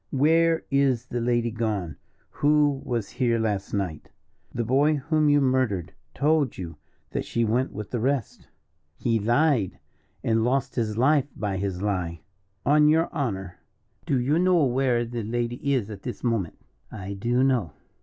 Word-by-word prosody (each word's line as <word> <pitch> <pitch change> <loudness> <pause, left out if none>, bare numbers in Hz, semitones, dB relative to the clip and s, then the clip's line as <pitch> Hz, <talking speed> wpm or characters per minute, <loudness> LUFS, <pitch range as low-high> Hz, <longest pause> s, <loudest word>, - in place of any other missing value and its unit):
"Where 160 +4 +3
is 135 -3 +2
the 120 -2 -3
lady 120 -1 +1
gone 105 -8 -2 0.4
who 145 -2 +2
was 120 -5 -2
here 120 -3 +1
last 105 -3 -2
night?" 95 -7 -3 0.4
"The 120 - -2
boy 140 +6 +3
whom 155 +1 +1
you 145 0 +5
murdered 130 - 0 0.2
told 150 -3 +1
you 85 -3 -7 0.3
that - - -2
she 115 0 -1
went 120 +5 0
with 105 0 -7
the 120 - -1
rest." 130 -1 -2 0.5
"He 115 -2 +1
lied, 120 - +2 0.5
and 115 -1 +2
lost 135 +2 0
his 110 -3 -2
life 140 +2 +3
by 100 -3 -2
his 95 -1 -3
lie." 90 -5 -2 0.4
"On 150 +2 +5
your 160 +2 +2
honour, 100 - -3 0.5
do 135 - +2
you 145 +7 +1
know 180 -3 +4
where 125 -2 +1
the 120 0 -4
lady 120 +4 -2
is 115 -6 0
at 100 -2 -8
this 125 - -6
moment?" 115 -9 -1 0.3
"I 100 -2 -6
do 120 +6 +1
know." 120 - +1
120 Hz, 160 wpm, -25 LUFS, 105-140 Hz, 0.5 s, you